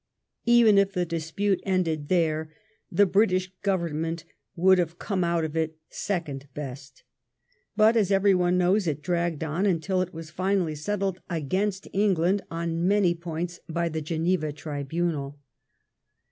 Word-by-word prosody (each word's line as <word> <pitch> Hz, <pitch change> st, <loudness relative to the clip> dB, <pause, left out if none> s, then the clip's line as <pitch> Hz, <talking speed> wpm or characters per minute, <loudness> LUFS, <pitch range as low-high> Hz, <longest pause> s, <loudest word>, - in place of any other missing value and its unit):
Even 235 Hz, -4 st, +6 dB
if 200 Hz, 0 st, +2 dB
the 180 Hz, -2 st, 0 dB
dispnie 170 Hz, +4 st, -1 dB
ended 165 Hz, -6 st, 0 dB
there, 160 Hz, -3 st, +1 dB, 0.4 s
the 205 Hz, -, +5 dB
British 185 Hz, -1 st, +2 dB
Oovemment 165 Hz, -4 st, -1 dB, 0.3 s
would 185 Hz, +2 st, +5 dB
have 170 Hz, -1 st, -1 dB
come 195 Hz, -4 st, -1 dB
out 170 Hz, -1 st, +1 dB
of 155 Hz, 0 st, -6 dB
it 160 Hz, -1 st, -1 dB
second 150 Hz, -8 st, -3 dB
best; 140 Hz, -1 st, -8 dB, 0.7 s
bQt» 220 Hz, +1 st, +5 dB
as 200 Hz, -3 st, +2 dB
everyone 185 Hz, -2 st, +3 dB
knows, 180 Hz, +2 st, +2 dB
it 150 Hz, -1 st, -2 dB
dragged 170 Hz, -3 st, -1 dB
on 160 Hz, +6 st, 0 dB
until 185 Hz, +1 st, +1 dB
it 185 Hz, 0 st, -3 dB
was 160 Hz, -2 st, -9 dB
finally 185 Hz, -2 st, 0 dB
settled 190 Hz, +4 st, -2 dB
against 185 Hz, +5 st, -1 dB
England 195 Hz, -1 st, +2 dB
on 165 Hz, +1 st, -1 dB
most 190 Hz, -4 st, +3 dB
points 170 Hz, +1 st, -4 dB
by 170 Hz, +1 st, 0 dB
the 160 Hz, 0 st, -3 dB
Geneva 160 Hz, 0 st, 0 dB
tribunal. 145 Hz, 0 st, -3 dB
175 Hz, 140 wpm, -26 LUFS, 160-190 Hz, 0.7 s, Even